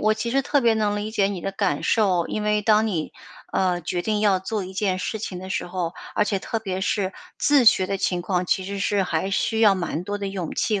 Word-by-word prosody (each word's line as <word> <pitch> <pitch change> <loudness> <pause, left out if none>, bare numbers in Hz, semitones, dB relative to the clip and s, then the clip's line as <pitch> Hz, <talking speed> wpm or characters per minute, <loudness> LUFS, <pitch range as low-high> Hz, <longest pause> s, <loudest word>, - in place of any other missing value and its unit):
我 215 0 +3
其 230 +2 -3
实 275 +3 +2
特 275 0 +1
别 230 - +5
能 210 -2 0
理 205 +1 -3
解 205 -3 +2
你 190 -4 -4
的 195 - -3
感 145 -6 0
受。 190 -6 +2
因 215 - -2
为 210 0 +1
当 215 +1 +4
你， 170 -8 -2 0.4
呃， 180 -2 +1
决 175 +2 -2
定 210 +2 -1
要 200 -3 +3
做 200 0 -3
一 185 - -8
件 190 -1 0
事 220 - -3
情 190 -3 -5
的 185 +1 -8
时 - - -2
候， 175 -1 -3 0.2
而 210 - +3
且 205 -1 -1
特 225 - -3
别 190 -4 -4
是 195 -1 0 0.2
自 285 -4 +3
学 190 -4 +6
的 195 0 -2
情 180 -2 0
况， 180 0 -1
其 190 - +1
实 200 +1 -4
是 200 0 +1
还 180 +1 -1
需 220 +3 0
要 210 -3 +6
蛮 175 -3 -3
多 205 +3 -3
的 200 -1 -4
勇 185 -4 -4
气 210 -3 0
195 Hz, 270 characters per minute, -23 LUFS, 185-215 Hz, 0.4 s, 学